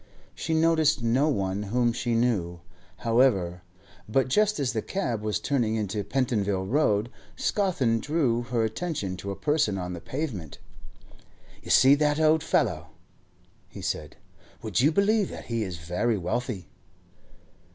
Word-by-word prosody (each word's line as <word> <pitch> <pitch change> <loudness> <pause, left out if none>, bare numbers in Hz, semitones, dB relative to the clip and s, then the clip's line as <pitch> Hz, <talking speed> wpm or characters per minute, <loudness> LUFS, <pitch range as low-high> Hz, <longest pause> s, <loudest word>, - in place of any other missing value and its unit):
She 160 - -2
noticed 160 -4 +3
no 130 +6 +2
one 100 -6 -1
whom 120 +3 +1
she 120 0 -1
knew, 95 -8 0 0.4
however; 110 -8 +2 0.5
but 130 +3 +1
just 210 +5 +2
as 135 -3 0
the 110 - -1
cab 120 - -2
was 105 -1 -1
turning 120 -6 0
into 105 -1 -2
Pentonville 100 -5 0
Road, 115 -2 +1 0.2
Scawthorne 140 - +1
drew 135 -4 0
her 120 -1 -1
attention 110 - -3
to 100 - -6
a 100 - -3
person 145 -9 +1
on 90 -1 -4
the 85 - -7
pavement. 120 - -5 1.0
'You - - -11
see 135 +1 +7
that 150 +1 +2
old 155 0 +4
fellow,' - - 0 0.8
he - - -10
said. 75 0 -4 0.5
'Would - - 0
you 145 +4 +4
believe 200 +2 +2
that - - -8
he 115 -1 -2
is 95 -5 -4
very 90 +8 -1
wealthy? 100 - -3
120 Hz, 145 wpm, -26 LUFS, 100-145 Hz, 1.0 s, see